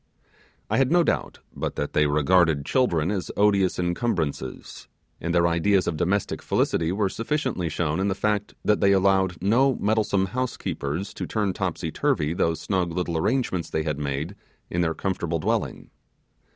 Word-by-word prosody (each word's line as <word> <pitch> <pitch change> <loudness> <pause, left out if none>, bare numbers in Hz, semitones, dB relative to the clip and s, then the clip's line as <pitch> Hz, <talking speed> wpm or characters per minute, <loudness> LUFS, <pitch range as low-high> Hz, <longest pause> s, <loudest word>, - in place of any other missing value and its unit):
I - - 0
had 135 -1 +2
no 175 0 +5
doubt - - -2
but - - -3
that 75 - -3
they 75 0 +3
regarded 75 0 +3
children 90 - +1
as 95 -3 -3
odious 100 -2 +3
incumbrances; 85 - -3 0.3
and 85 - -3
their 85 0 +3
ideas 90 +3 +2
of 80 - -1
domestic 95 +6 -1
felicity 80 0 0
were 100 +1 +1
sufficiently 115 - -2
shown 80 0 -1
in 95 - +1
the 95 - 0
fact, 105 0 -1
that 105 - +2
they 100 -1 +5
allowed 95 -2 +2
no 125 +6 +3
meddlesome 105 -2 +1
housekeepers 100 - -3
to - - -5
turn 105 -4 0
topsy - - -3
turvy 75 +2 0
those 80 -2 0
snug 90 +1 -1
little 85 0 -2
arrangements 95 - 0
they 80 - -1
had 75 -2 -2
made 75 +6 -3 0.4
in 85 - 0
their 80 -2 0
comfortable 85 -3 -2
dwelling. 80 - -2
90 Hz, 165 wpm, -25 LUFS, 80-105 Hz, 0.4 s, no